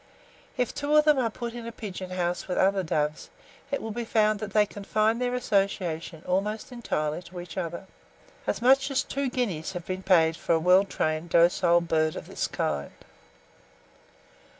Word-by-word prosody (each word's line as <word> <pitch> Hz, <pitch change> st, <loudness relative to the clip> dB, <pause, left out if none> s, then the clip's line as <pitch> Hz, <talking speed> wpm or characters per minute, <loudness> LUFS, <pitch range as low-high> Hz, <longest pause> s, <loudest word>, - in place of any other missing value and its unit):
If 250 Hz, -2 st, 0 dB
two 290 Hz, +1 st, 0 dB
of 300 Hz, -, +5 dB
them 300 Hz, -3 st, +5 dB
are 235 Hz, -3 st, +1 dB
put 235 Hz, +1 st, -6 dB
in 235 Hz, -1 st, -7 dB
a -, -, -5 dB
pigeon 190 Hz, -5 st, -7 dB
house 175 Hz, -1 st, -2 dB
with 180 Hz, -, -2 dB
other 195 Hz, 0 st, +3 dB
doves, 150 Hz, -3 st, -2 dB, 0.4 s
it 280 Hz, -, -2 dB
will 225 Hz, -, -4 dB
be 240 Hz, +2 st, -3 dB
found 215 Hz, -2 st, +2 dB
that 215 Hz, -2 st, -5 dB
they 210 Hz, 0 st, +4 dB
confine 215 Hz, +3 st, 0 dB
their 250 Hz, 0 st, 0 dB
association 185 Hz, -7 st, -1 dB
almost 210 Hz, +6 st, -1 dB
entirely 155 Hz, -10 st, -2 dB
to 180 Hz, 0 st, -10 dB
each 175 Hz, -2 st, -9 dB
other. 175 Hz, 0 st, -4 dB, 0.6 s
As -, -, -1 dB
much 270 Hz, +2 st, +5 dB
as 275 Hz, -, +1 dB
two 275 Hz, -1 st, -2 dB
guineas 195 Hz, -10 st, -2 dB
have 175 Hz, -2 st, -6 dB
been 185 Hz, 0 st, -4 dB
paid 165 Hz, -4 st, +4 dB
for 170 Hz, -, 0 dB
a -, -, +2 dB
well 180 Hz, +4 st, +5 dB
trained 155 Hz, -3 st, -2 dB
docile 170 Hz, +1 st, +4 dB
bird 155 Hz, -2 st, +1 dB
of -, -, -6 dB
this -, -, -3 dB
kind. 70 Hz, -1 st, -2 dB
195 Hz, 180 wpm, -27 LUFS, 170-230 Hz, 0.6 s, of